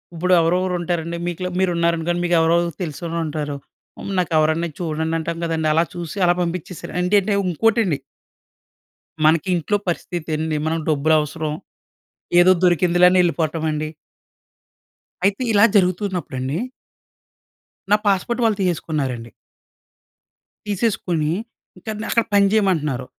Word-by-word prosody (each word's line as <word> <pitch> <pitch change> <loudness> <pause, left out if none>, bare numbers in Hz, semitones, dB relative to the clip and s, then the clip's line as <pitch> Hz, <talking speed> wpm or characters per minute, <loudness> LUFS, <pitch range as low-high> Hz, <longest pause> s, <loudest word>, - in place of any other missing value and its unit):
ఇప్పుడు 180 +3 +1
ఎవరెవరు 180 +2 +1
ఉంటారండి. 170 0 -2
మీకుల 180 +1 -3
మీరు 185 -2 +2
ఉన్నారనుకోండి. 170 +1 0
మీకు 175 0 +2
ఎవరెవరు 170 +1 +2
తెలిసినోళ్ళు 165 +1 -4
ఉంటారు. 150 -1 -3 0.4
హ్మ్, 200 - -6
నాకు 175 -2 -1
ఎవరన్నా 160 +2 +2
చూడండి 160 -1 -2
అంటాం 165 +1 -4
కదండీ. 160 -1 -1
అలా 165 +2 +3
చూసి 175 +3 -6
అలా 175 - +4
పంపించేసారు. 175 0 -5
అంటంటే 200 +3 +2
ఇంకోటండి... 195 -2 +1 1.3
మనకి 160 +3 +3
ఇంట్లో 205 +5 0
పరిస్థితి 170 -1 -4
అండి 155 0 -2
మనకు 160 0 -1
డబ్బులు 155 +1 +2
అవసరం, 150 0 -3 0.9
ఏదో 185 +1 +7
దొరికిందిలే 175 0 +4
అని 185 0 +3
ఎళ్ళిపోవటం 165 -2 -1
అండి. 155 0 -2 1.4
అయితే, 200 +5 +1
ఇలా 205 0 +5
జరుగుతున్నప్పుడు 185 -5 0
అండి. 135 +5 -2 1.3
నా - - +8
పాస్‌పోర్ట్ 205 +5 +1
వాళ్ళు 220 -2 +2
తీసేసుకున్నారండి... 145 -9 -2 1.4
తీసేసుకొని, 185 -7 -1 0.5
ఇంకా 220 +4 -6
నన్ను 215 - -5
అక్కడ 230 - +2
పని 200 0 +5
చేయమంటున్నారు. 155 - +1
170 Hz, 125 wpm, -21 LUFS, 160-185 Hz, 1.4 s, నా